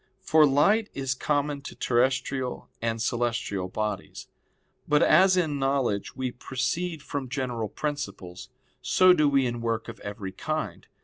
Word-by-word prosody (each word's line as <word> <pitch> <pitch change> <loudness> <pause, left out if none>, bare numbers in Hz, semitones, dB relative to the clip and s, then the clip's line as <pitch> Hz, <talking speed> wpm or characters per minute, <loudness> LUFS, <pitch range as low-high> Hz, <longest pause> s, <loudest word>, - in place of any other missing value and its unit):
For 155 -1 +5
light 200 +11 +3
is 135 -1 -1
common 145 +1 -1
to 140 - -9
terrestrial 130 +1 0
and 115 0 -1
celestial 115 -5 -1
bodies. 105 +3 -4 0.6
But 150 0 +4
as 190 0 +5
in 155 -5 0
knowledge 135 -7 0
we 130 -1 -2
proceed 150 +6 -3
from 140 -4 -4
general 125 -5 -3
principles, 130 -10 -5 0.3
so 185 0 +5
do 150 -4 +3
we 135 -2 +3
in 120 -1 -3
work 115 -1 -2
of 115 -2 -9
every 100 -1 -6
kind. - - -4
130 Hz, 140 wpm, -27 LUFS, 115-145 Hz, 0.6 s, For